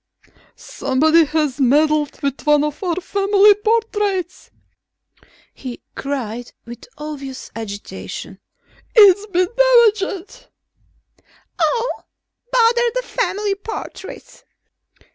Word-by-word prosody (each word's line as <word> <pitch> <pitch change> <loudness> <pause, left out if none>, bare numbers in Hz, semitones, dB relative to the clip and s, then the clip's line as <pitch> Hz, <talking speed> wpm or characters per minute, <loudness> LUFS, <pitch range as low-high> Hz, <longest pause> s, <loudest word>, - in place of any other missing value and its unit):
"Somebody 315 +5 +2
has 295 -3 -1
meddled 300 +3 +2
with 280 +2 -3
one 295 -1 +4
of 300 0 -4
our 350 -3 0
family 400 +2 +3
portraits," 415 -4 -1 1.0
he 250 -3 -9
cried 245 -4 -5
with 235 0 -11
obvious 280 -3 -7
agitation. 205 -2 -7 0.6
"It's 410 -2 +6
been 365 -2 +1
damaged...." 465 -3 +2 1.1
"Oh, 485 0 0 0.5
bother 475 0 +3
the - - -1
family 400 -1 -1
portraits!" 400 -1 -9
360 Hz, 85 wpm, -19 LUFS, 285-420 Hz, 1.1 s, It's